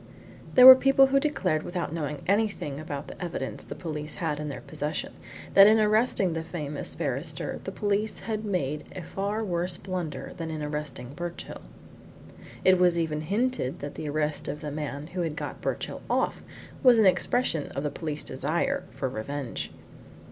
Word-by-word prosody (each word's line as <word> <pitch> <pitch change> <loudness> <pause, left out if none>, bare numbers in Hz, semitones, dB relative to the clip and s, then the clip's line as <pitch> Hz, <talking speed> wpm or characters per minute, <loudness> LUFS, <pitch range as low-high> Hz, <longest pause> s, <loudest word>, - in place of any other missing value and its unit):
There 250 - +9
were 260 - +15
people 270 +1 +5
who 270 +1 +3
declared 275 - 0
without 175 -2 -4
knowing 150 -3 -4
anything 200 -8 0
about 145 -2 -5
the - - -8
evidence 170 -6 -4
the 145 - -8
police 150 -2 -5
had 155 -4 -2
in 150 0 -4
their 140 - -6
possession 150 +2 -4 0.4
that 195 0 +9
in 220 +1 +6
arresting 215 -4 +2
the 165 - -2
famous 150 -3 -5
barrister - - -2
the - - -3
police 210 +1 -1
had 215 -1 -3
made 150 -8 -1
a 185 - -5
far 205 +5 -2
worse 175 -2 -2
blunder 180 -5 -5
than 165 -1 -4
in 155 -1 -4
arresting 150 -4 -5
Birchill. 175 +2 -6 1.0
It 185 -1 +6
was 175 -1 +5
even 155 -2 -1
hinted 205 - 0
that 145 - -5
the 155 - -5
arrest 150 0 -1
of 145 +1 -4
the 150 - -4
man 145 -1 -4
who 175 +3 -4
had 160 -3 -2
got - - -6
Birchill - - -3
off - - 0 0.4
was 250 -4 +7
an 220 - +5
expression 185 - +2
of 140 - -3
the 150 - -1
police 155 -3 -4
desire 170 - -1
for 135 - -3
revenge. 130 +2 -4
165 Hz, 175 wpm, -27 LUFS, 150-205 Hz, 1.0 s, were